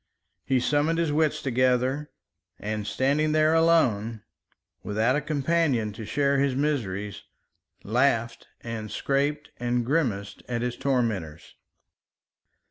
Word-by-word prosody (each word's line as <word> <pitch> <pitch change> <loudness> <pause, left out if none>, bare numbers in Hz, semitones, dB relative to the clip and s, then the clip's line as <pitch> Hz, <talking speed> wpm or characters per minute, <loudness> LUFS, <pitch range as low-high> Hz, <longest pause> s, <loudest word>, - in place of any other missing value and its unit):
He 130 -1 +1
summoned 145 +6 +1
his 165 -3 +1
wits 155 0 +1
together 130 +3 +1 0.5
and 105 0 -4
standing 150 +3 +1
there 155 0 +4
alone, 115 -10 +2 0.6
without 110 +5 +1
a 150 - 0
companion 145 -6 0
to 110 0 -8
share 140 +2 +1
his 140 -2 +1
miseries, 105 -9 -2 0.6
laughed 120 0 +1
and 110 -2 -5
scraped 145 +4 -1
and 120 0 -1
grimaced 110 -9 -1
at 120 -1 -1
his 125 -1 -2
tormentors. 110 - -2
130 Hz, 115 wpm, -26 LUFS, 110-145 Hz, 0.6 s, there